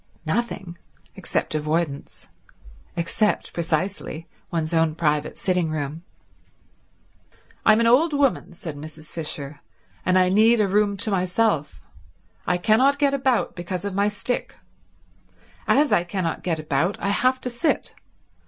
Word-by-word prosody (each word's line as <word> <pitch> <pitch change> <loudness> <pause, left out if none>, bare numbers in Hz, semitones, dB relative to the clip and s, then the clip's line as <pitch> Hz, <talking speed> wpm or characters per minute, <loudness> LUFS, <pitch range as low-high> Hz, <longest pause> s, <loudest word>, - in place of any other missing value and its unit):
Nothing, 190 -2 -3 0.4
except - - -2
avoidance; 155 -1 -2 0.7
except, 175 +5 0
precisely, 165 0 -2 0.2
one's 165 -1 -2
own 160 -1 +2
private 150 -2 0
sitting 180 -4 0
room. 155 +1 -4 1.7
"I'm 215 0 +7
an 230 - +3
old 270 +8 +5
woman," 280 -9 +1
said 165 -3 -7
Mrs. 155 +1 -10
Fisher, 150 -3 -4 0.4
"and 185 0 +3
I 185 0 +4
need 220 +4 +5
a 210 - +3
room 200 +1 +2
to 210 +2 0
myself. 185 -4 0 0.6
I 180 - +2
cannot 240 +10 +3
get 285 -1 +2
about, 260 -3 +1
because 180 +1 -5
of 200 - -3
my 200 +2 +2
stick. 230 +4 -2 1.1
As 295 +1 +4
I 175 - +4
cannot 175 -1 -3
get 170 -3 -1
about 155 +4 0
I 195 - -1
have 255 +5 +2
to 250 - -3
sit. 300 +7 0
185 Hz, 135 wpm, -23 LUFS, 160-220 Hz, 1.7 s, I'm